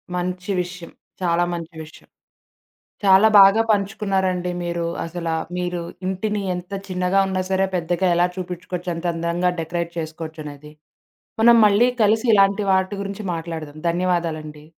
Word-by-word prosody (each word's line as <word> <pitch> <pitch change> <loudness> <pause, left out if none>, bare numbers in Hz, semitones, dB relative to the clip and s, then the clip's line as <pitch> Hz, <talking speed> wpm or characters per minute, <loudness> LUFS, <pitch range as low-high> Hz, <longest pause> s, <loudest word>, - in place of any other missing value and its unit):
మంచి 180 +2 -3
విషయం. 180 -1 -8 0.3
చాలా 175 -1 +2
మంచి 170 0 -7
విషయం. 155 - -16 1.0
చాలా 195 +2 +6
బాగా 195 +3 +7
పంచుకున్నారండి 195 -3 0
మీరు, 170 0 -2 0.2
అసల 170 0 -6 0.3
మీరు 180 -1 -2 0.3
ఇంటిని 205 +2 -2
ఎంత 180 +2 -8 0.2
చిన్నగా 185 +1 +1
ఉన్నా 190 -1 -1
సరే 190 0 +2
పెద్దగా 175 +2 0
ఎలా 175 +1 +3
చూపించుకోవచ్చు, 180 -1 -5
అంత 165 +2 -7
అందంగా 170 +2 0
డెకరేట్ 170 +1 -3
చేసుకోవచ్చనేది. 155 -2 -8 0.7
మనం 235 +1 +7
మళ్ళీ 210 +4 +4
కలిసి 220 +3 +2
ఇలాంటి 200 +1 +3
వాటి 190 +2 +1
గురించి 200 +1 -6
మాట్లాడదాం. 160 -2 -6
ధన్యవాదాలండి. 165 -4 -2
180 Hz, 125 wpm, -21 LUFS, 170-195 Hz, 1.0 s, బాగా